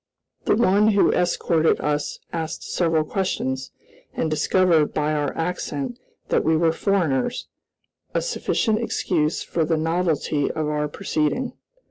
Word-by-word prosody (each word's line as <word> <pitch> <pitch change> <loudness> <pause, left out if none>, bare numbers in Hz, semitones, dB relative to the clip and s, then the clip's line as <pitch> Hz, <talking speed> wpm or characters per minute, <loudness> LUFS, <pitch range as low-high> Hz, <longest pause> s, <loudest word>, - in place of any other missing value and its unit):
The - - +3
one 210 -2 +4
who 200 - +4
escorted 170 -2 +2
us 150 0 -1 0.2
asked 165 -1 -4
several 165 -3 +1
questions, 130 -8 -2 0.5
and 160 - -1
discovered, 165 0 +2
by 150 0 +1
our 145 -2 0
accent, 170 - -3 0.3
that - - +2
we 160 0 +3
were 165 0 +3
foreigners, 195 - 0 0.7
a - - 0
sufficient 225 - 0
excuse 165 -8 0
for 165 - -1
the 160 +1 +1
novelty 160 -3 0
of 155 -1 -2
our 150 0 0
proceeding. 190 - -1
160 Hz, 130 wpm, -23 LUFS, 150-185 Hz, 0.7 s, one